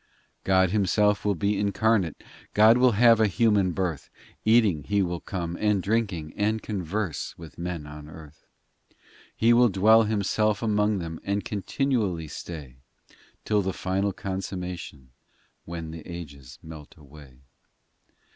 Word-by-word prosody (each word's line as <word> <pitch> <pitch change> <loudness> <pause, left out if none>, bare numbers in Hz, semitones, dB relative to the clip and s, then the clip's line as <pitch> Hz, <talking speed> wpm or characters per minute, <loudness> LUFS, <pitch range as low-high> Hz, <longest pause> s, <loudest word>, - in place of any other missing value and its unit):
XI - - -39
God 95 -1 +3
Himself 105 0 +2
will 105 -1 +1
be 100 +3 0
incarnate, 100 -4 0 0.3
God 110 +3 +6
will 125 -2 +5
have 115 +1 +5
a 110 - +4
human 105 -2 +2
birth; 85 -5 -3 0.3
Eating, 110 -8 +3
He 100 +3 +1
will 90 -1 -3
come, 85 -3 -5
and 105 -2 +2
drinking, 100 -8 -1
And 110 +2 0
converse 100 -4 -4
with 85 -1 -12
men 85 -3 -4
on 75 0 -10
earth. 75 -1 -14 0.4
XII - - -33 0.4
He 115 +1 +4
will 120 0 +5
dwell 110 +4 +5
Himself 105 0 0
among 105 -1 +1
them 80 -3 -6
And 100 +1 -2
continually 105 - -1
stay, 70 -8 -8 0.7
Till 105 -1 +2
the 95 -1 -2
final 95 +2 -1
consummation 90 -8 -6 0.5
When 85 -1 -6
the 80 0 -8
ages 70 -7 -9
melt 80 -2 -11
away. 70 -3 -16
95 Hz, 140 wpm, -26 LUFS, 80-105 Hz, 0.7 s, God